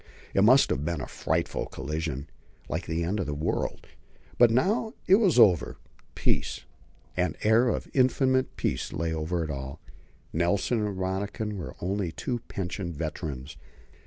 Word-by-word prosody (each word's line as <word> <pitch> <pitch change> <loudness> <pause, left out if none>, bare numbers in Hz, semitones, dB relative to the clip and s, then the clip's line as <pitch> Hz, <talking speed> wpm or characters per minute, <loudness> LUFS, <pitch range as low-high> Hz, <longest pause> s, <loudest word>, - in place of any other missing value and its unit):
It 95 - +4
must 130 +5 +6
have 70 - 0
been 85 0 -1
a 65 - -4
frightful - - -1
collision, 75 0 -4 0.4
like - - -3
the 80 +1 -1
end 95 +5 -1
of 90 - -2
a 75 - -2
world. 75 +3 -2 0.5
But 120 - +8
now 205 - +1
it 190 - +7
was 195 - +3
over: 85 - +5 0.4
peace - - 0 0.5
an 90 -3 0
air 110 +3 +5
of - - -2
infinite 130 0 +2
peace - - -1
lay 80 0 -1
over 80 +2 -1
it 80 - -3
all. 65 -1 -6 0.5
Nelson 100 +7 +1
and 100 -2 -2
Rönniken 100 +3 -2
were 95 - -6
only 95 -1 -1
two 120 +8 -3
pensioned 90 -2 -4
veterans. 75 -3 -5
90 Hz, 155 wpm, -28 LUFS, 80-110 Hz, 0.5 s, But